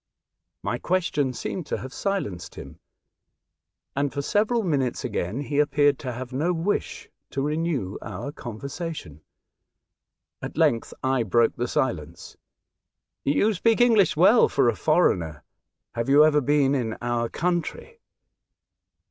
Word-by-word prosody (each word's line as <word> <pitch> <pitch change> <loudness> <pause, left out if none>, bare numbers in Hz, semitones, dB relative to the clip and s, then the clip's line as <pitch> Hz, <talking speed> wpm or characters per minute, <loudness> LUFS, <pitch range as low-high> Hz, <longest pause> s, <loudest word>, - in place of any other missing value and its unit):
My 105 +6 -2
question 165 -7 0
seemed 145 +7 -5
to - - -2
have 130 +1 -8
silenced 105 - -3
him, - - -10 1.2
and, 140 0 0
for 140 0 -3
several 220 +7 +1
minutes 135 -9 -1
again, 105 +1 -2
he 145 0 -2
appeared 145 -1 +3
to 130 - -4
have 125 +1 -7
no 160 +7 +1
wish 175 +5 -2 0.2
to 135 - -4
renew 150 - -2
our 100 +7 -6
conversation. 135 - -7 1.2
At - - -7
length 115 -1 +2
I 130 -1 +2
broke 115 +2 +2
the 120 - -2
silence. 85 - -3 0.9
"You 205 +10 +2
speak 225 +5 +2
English 225 -7 +4
well - - +6
for - - +3
a - - -1
foreigner. 80 -3 +1 0.5
Have 115 +2 -2
you 145 +2 +7
ever 150 -1 +3
been 145 0 +2
in 120 -5 -1
our 120 -1 -1
country 180 - -3
140 Hz, 130 wpm, -25 LUFS, 120-165 Hz, 1.2 s, you